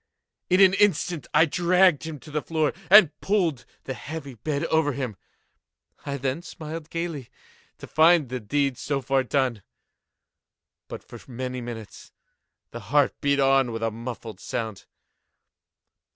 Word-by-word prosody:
In 185 +2 +4
an 190 -1 +7
instant 180 -6 +1
I 160 - +5
dragged 175 0 +3
him 160 -3 -6
to 155 - -12
the 150 0 -1
floor, 155 -2 0 0.2
and 200 -5 +8
pulled 170 - 0 0.2
the 130 - -4
heavy 145 +1 -7
bed 140 +5 -3
over 160 -3 +1
him. 125 -5 -4 0.9
I 140 0 -2
then 135 +4 -2
smiled 160 -1 -8
gaily, 165 -7 -4 0.5
to - - -10
find 160 -3 +4
the 130 0 -3
deed 135 +3 -1
so 140 0 -1
far 135 +1 +1
done. 130 -4 -1 1.3
But, - - -8
for - - -12
many 125 +1 -4
minutes, 115 -3 -9 0.6
the 120 - -7
heart 145 0 +3
beat 140 -1 +2
on 135 -2 +3
with 115 0 -4
a 115 - 0
muffled 115 -3 -7
sound. 110 -3 -5
140 Hz, 145 wpm, -25 LUFS, 125-160 Hz, 1.3 s, and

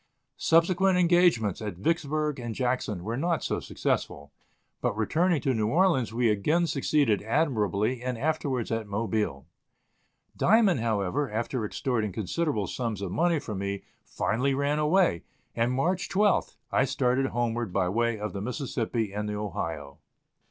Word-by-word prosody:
Subsequent 180 +3 +3
engagements 175 - +3
at 105 -4 -4
Vicksburg 150 - -1
and 120 -2 -5
Jackson 120 -7 -1
were 115 +4 -3
not 170 +3 0
so - - -1
successful, 70 0 -3 0.5
but 105 - -1
returning 165 - +2
to 135 - +1
New 110 -2 0
Orleans 155 - +2
we 120 +1 +1
again 150 - +2
succeeded 140 -7 +1
admirably 115 -3 0
and 125 -1 -3
afterwards 140 -3 -1
at 115 -1 -2
Mobile. 105 -8 -2 0.9
Diamond, 205 - +4
however, 115 +4 0
after 115 +2 -2
extorting 110 -1 -1
considerable 110 - -1
sums 110 -2 -3
of 95 - -4
money 170 - +2
from 105 -9 -5
me, 100 0 -3 0.2
finally 130 +5 0
ran 140 +2 0
away, 155 - +3 0.3
and, 115 +2 +1
March 175 +9 0
12th, 205 +1 +2 0.2
I - - +3
started 135 0 +1
homeward 120 -3 -2
by 95 -1 +1
way 115 +4 0
of 105 0 -4
the 100 - -4
Mississippi 115 -3 -2
and 105 +1 -3
the 105 - -3
Ohio. 80 -8 -5
120 Hz, 145 wpm, -27 LUFS, 105-150 Hz, 0.9 s, Diamond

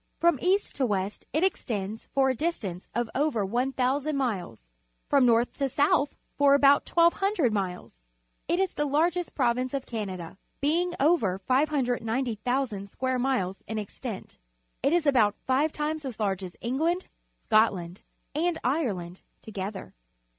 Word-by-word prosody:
From 340 -5 +3
east 385 +3 +1
to 270 - +2
west 200 -1 -2
it 310 - +1
extends 220 - -2
for 265 -1 +3
a - - -3
distance 220 - -3
of 240 0 0
over 265 -7 +1
1,000 265 +6 0
miles, 195 - -2 0.4
from 275 -3 +4
north 235 +1 +3
to 275 -1 +1
south 285 +1 +2 0.2
for 280 -1 +5
about 280 0 +5
1,200 340 - +3
iniles. 180 - -4 0.5
It 345 - +1
is 385 -2 +1
the 295 - -1
largest 340 +5 0
province 255 0 +1
of 270 - -3
Canada, 190 -6 -5 0.2
being 345 +5 +1
over 270 - +3
590,000 245 -3 0
square 260 +4 -1
miles 245 -8 -1
in 220 - -3
extent. 215 +1 -7 0.4
It - - +2
is 345 -1 +2
about 230 -8 +4
five 275 +4 +2
times 305 +1 -3
as 255 -5 -6
large 195 -3 -1
as 180 -2 -8
England, 320 +10 0 0.4
Scotland, 195 -5 +2 0.3
and 330 +3 0
Ireland 200 - -1 0.2
together. 200 -2 -6
255 Hz, 140 wpm, -27 LUFS, 210-295 Hz, 0.5 s, for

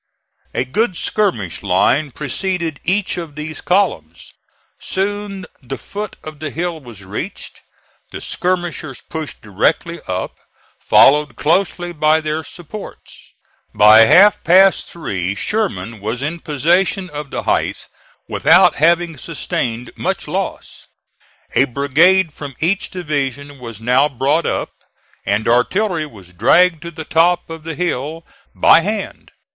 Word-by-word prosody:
A 120 - 0
good 185 - -1
skirmish 165 - -1
line 120 +10 +2
preceded 160 +3 -3
each 190 +1 0
of 165 -4 -6
these 150 0 -6
columns. 85 - -1 0.5
Soon 200 0 -3 0.2
the 135 +1 -6
foot 210 0 -7
of 155 -1 -9
the 155 0 -4
hill 170 +1 -3
was 120 -8 -12
reached; 105 - -6 0.5
the - - -6
skirmishers 175 -6 -3
pushed 160 -2 -7
directly 155 - 0
up, 90 0 -4 0.4
followed 145 -2 +4
closely 175 +3 0
by 155 0 +3
their 155 0 -3
supports. 180 +6 -10 0.6
By 110 +2 +8
half 200 - +6
past 190 +3 +5
three 95 - -3
Sherman 185 - -2
was 110 +6 -3
in 160 +4 -3
possession 175 +6 +1
of 150 -1 -6
the - - -4
height - - -1 0.4
without 180 +2 +4
having 170 0 +2
sustained 125 -6 -4
much - - -3
loss. - - -5 0.7
A 125 +4 +4
brigade 150 +7 +3
from 140 -3 -8
each 185 +5 0
division 145 -4 -4
was 115 -4 -8
now 125 +5 +3
brought 140 +5 0
up, - - -2 0.6
and 100 +2 0
artillery 160 - +1
was 95 -9 -15
dragged 165 - +4
to 170 - -6
the 160 -1 -8
top 165 +2 +2
of 165 -1 -7
the 165 -1 -5
hill 165 -1 -3 0.3
by - - +6
hand. 205 +4 -4
155 Hz, 130 wpm, -18 LUFS, 130-180 Hz, 0.7 s, By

